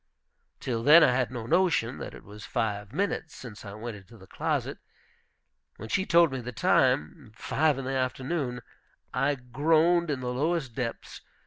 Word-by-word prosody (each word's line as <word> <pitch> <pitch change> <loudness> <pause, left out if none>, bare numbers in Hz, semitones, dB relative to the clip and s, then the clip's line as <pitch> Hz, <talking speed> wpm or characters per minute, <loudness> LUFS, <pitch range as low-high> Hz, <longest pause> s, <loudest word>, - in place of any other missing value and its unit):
Till 115 -3 -2
then 150 +7 +8
I - - +5
had 125 0 0
no 120 -3 -6
notion 135 -5 +1
that - - -7
it - - -13
was 105 +1 -12
five 105 -2 -3
minutes 160 0 -2
since 115 -5 -10
I 100 -2 -8
went 110 +1 -6
into 100 +4 -16
the 95 - -15
closet. - - -2 1.0
When 110 - -9
she 190 - 0
told 170 -2 +5
me 130 -1 -4
the 125 +1 -6
time, 80 -4 +1
five 150 +4 +1
in 135 - -5
the 135 - -2
afternoon, 130 0 -2 0.5
I 145 +2 +1
groaned 160 +7 +2
in 140 -3 -1
the 125 0 -3
lowest 145 -1 -1
depths. 120 -2 -5
130 Hz, 175 wpm, -28 LUFS, 115-155 Hz, 1.0 s, then